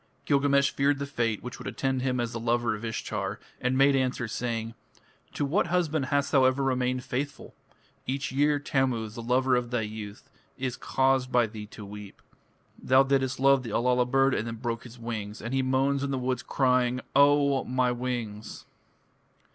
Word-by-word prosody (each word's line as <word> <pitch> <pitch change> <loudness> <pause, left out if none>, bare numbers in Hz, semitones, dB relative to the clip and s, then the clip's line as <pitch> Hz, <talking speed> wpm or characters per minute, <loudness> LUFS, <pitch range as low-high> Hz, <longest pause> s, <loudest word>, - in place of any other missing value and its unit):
Gilgamesh 140 -1 +3
feared 140 +1 +1
the 140 - -3
fate 115 -6 -2
which 125 0 -7
would - - -7
attend 130 -1 -1
him 130 -1 0
as 120 -1 -1
the 115 - -4
lover 120 0 +1
of 105 +1 -7
Ishtar, 115 -1 -3 0.2
and 125 +1 0
made 135 +1 +5
answer 130 -3 0
saying: 115 0 -3 0.6
"To 145 - 0
what 170 +6 +1
husband 160 -5 0
hast 140 0 0
thou 135 -2 +5
ever 130 +1 +2
remained 130 -1 0
faithful? 135 +3 -4 0.5
Each 135 +2 -2
year 145 +2 +2
Tammuz, 130 -6 -1
the 120 - -7
lover 125 +2 +2
of 120 -1 -1
thy 120 -1 0
youth, 105 +1 -7 0.3
is 130 -2 -2
caused 130 -1 +1
by 120 -1 +4
thee 105 -1 -8
to 105 0 -10
weep. 105 0 -10 0.6
Thou 130 +1 +5
didst 135 -1 0
love 135 0 +5
the 120 - -7
Allala 125 +3 +2
bird 135 +1 +3
and 110 - -1
then 115 - -4
broke 115 0 -4
his 120 0 -11
wings, 110 -3 -5
and 115 +3 -5
he 135 - +2
moans 135 +2 +1
in 140 - -2
the 135 - -1
woods 125 -1 -1
crying, 125 -1 +1
'O 140 -1 +4
my 125 0 +1
wings!' 120 -4 -5
130 Hz, 185 wpm, -27 LUFS, 115-135 Hz, 0.6 s, made